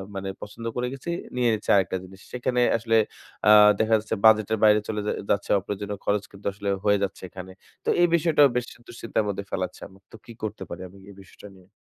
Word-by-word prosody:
মানে 95 0 -4
পছন্দ 115 +3 -9
করে 125 0 -1
গেছি, 135 +5 -8 0.3
নিয়ে 125 -1 +2
নিচ্ছি 105 - -5
আরেকটা 95 -1 +1
জিনিস। 95 +1 -14
সেখানে 125 0 -1 0.2
আসলে 115 0 +1 0.5
আ - - +9 0.3
দেখা 110 0 +2
যাচ্ছে 110 +1 -3
বাজেটের 110 0 +5
বাইরে 105 0 +6
চলে 105 -1 -2 0.3
যাচ্ছে 100 - 0
অপ্রয়োজনীয় 100 +1 -5
খরচ 100 0 +1
কিন্তু 100 0 -16
আসলে 100 0 -4 0.2
হয়ে 105 0 +4
যাচ্ছে 95 - -4
এখানে। 95 0 -9 0.3
তো - - 0
এই 175 - +6
বিষয়টাও 155 -3 +4
বেশি 125 0 -4
দুশ্চিন্তার 115 -2 -2
মধ্যে 100 0 -3
ফেলাচ্ছে। 90 -1 -4 0.3
তো - - -12
কি 115 - -11
করতে 110 - -4
পারি 95 - -7
আমি 100 - -17
এই 100 - -13
বিষয়টা 95 +2 -14
নিয়ে। 90 -1 -20
105 Hz, 200 wpm, -25 LUFS, 100-115 Hz, 0.5 s, আ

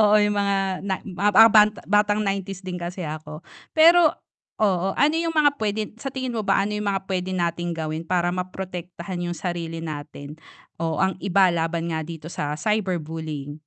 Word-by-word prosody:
oo 210 -1 +5
yung 205 0 +2
mga 195 -2 0
na 190 -1 -2
mga 200 +2 +1
ba 225 +3 +8
ba 210 0 +8 0.4
batang 210 0 0
90s 195 -1 -3
din 180 -1 -4
kasi 175 -1 -5
ako, 155 +1 -7 0.3
pero 330 0 +6 0.5
oo, 195 -3 +2
ano 300 +2 +3
yung 330 0 -1
mga 290 -1 +4
p'wede 215 0 -2
sa 270 - -3
tingin 260 -2 -4
mo 220 - -1
ba - - +2
ano 210 - -3
yung 210 -1 -2
mga 190 -1 -3
p'wede 185 -1 -2
nating 175 0 -1
gawin 155 0 -3
para 175 0 +1
ma-protektahan 180 -1 -5
yung 175 - -5
sarili 165 -2 -4
natin, 145 -1 -7 0.5
o 160 -2 -1
ang 190 +2 +2
iba 190 0 +4
laban 165 0 -1
nga 160 - -2
dito 160 -1 -8
sa 150 -1 -3
cyberbullying? 160 -7 -2
185 Hz, 180 wpm, -24 LUFS, 165-205 Hz, 0.5 s, ba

